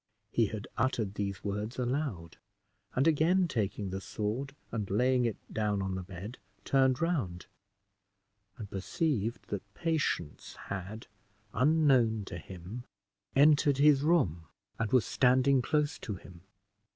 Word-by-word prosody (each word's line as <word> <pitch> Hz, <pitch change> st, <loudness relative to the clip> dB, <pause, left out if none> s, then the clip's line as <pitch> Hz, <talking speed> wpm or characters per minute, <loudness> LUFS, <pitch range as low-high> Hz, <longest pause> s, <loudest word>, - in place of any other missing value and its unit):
He 115 Hz, -2 st, +3 dB
had 105 Hz, 0 st, -6 dB
uttered 115 Hz, -5 st, 0 dB
these 100 Hz, -1 st, -3 dB
words 105 Hz, +3 st, -3 dB
aloud; 125 Hz, -, -2 dB, 0.6 s
and 130 Hz, -, +3 dB
again 165 Hz, +4 st, +3 dB
taking 105 Hz, -, -2 dB
the 95 Hz, +1 st, -4 dB
sword, 115 Hz, +9 st, -3 dB, 0.2 s
and 105 Hz, -4 st, -3 dB
laying 125 Hz, +5 st, +2 dB
it 115 Hz, -, -1 dB, 0.2 s
down 105 Hz, -2 st, 0 dB
on 95 Hz, -1 st, -2 dB
the 95 Hz, -, -3 dB
bed, 95 Hz, +6 st, -8 dB, 0.3 s
turned 130 Hz, -2 st, +3 dB
round, 125 Hz, -, -1 dB, 1.1 s
and 110 Hz, -4 st, -7 dB
perceived 115 Hz, -, -2 dB
that 100 Hz, 0 st, -6 dB
Patience 155 Hz, -, -2 dB
had, 100 Hz, +3 st, -5 dB, 0.5 s
unknown 130 Hz, -6 st, +3 dB
to -, -, -6 dB
him, 95 Hz, +6 st, -8 dB, 0.5 s
entered 145 Hz, 0 st, +5 dB
the 145 Hz, +2 st, +6 dB
room, 135 Hz, -, +1 dB, 0.3 s
and 115 Hz, -1 st, -1 dB
was 130 Hz, -3 st, +4 dB
standing 130 Hz, +1 st, +3 dB
close 150 Hz, +3 st, 0 dB
to 105 Hz, -, -5 dB
him. 90 Hz, -1 st, -13 dB
115 Hz, 130 wpm, -31 LUFS, 100-140 Hz, 1.1 s, the